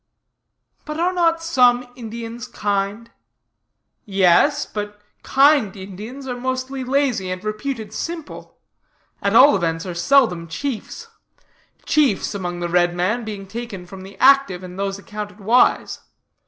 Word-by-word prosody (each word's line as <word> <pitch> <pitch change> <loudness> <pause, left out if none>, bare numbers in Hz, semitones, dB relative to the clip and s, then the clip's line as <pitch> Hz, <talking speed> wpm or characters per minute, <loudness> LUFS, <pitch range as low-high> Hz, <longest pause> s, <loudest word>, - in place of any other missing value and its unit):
But 305 +1 -6
are 360 +2 +1
not 330 -2 +1
some 250 -6 +3
Indians 230 -1 -7
kind? 205 +3 -2 0.9
Yes, 195 - +3
but 205 0 -6 0.2
kind 275 -7 +3
Indians 210 +8 -8
are 250 - -3
mostly 260 +1 -3
lazy, 255 -7 0
and 185 +1 -5
reputed 215 0 -4
simple 335 +2 -7 0.6
at 200 +2 0
all 280 +5 +8
events, 165 -2 -1
are 180 - -4
seldom 180 -3 +2
chiefs; 240 - -5 0.8
chiefs 280 -12 +2
among 175 -3 -4
the 175 - -1
red 175 0 +2
men 210 +7 0
being 205 -3 -6
taken 210 -3 -7
from 190 +1 -11
the 195 +1 -12
active, 265 -10 +4
and 180 +1 -9
those 195 0 -2
accounted 210 0 -8
wise. 225 +5 +2
215 Hz, 130 wpm, -21 LUFS, 195-265 Hz, 0.9 s, all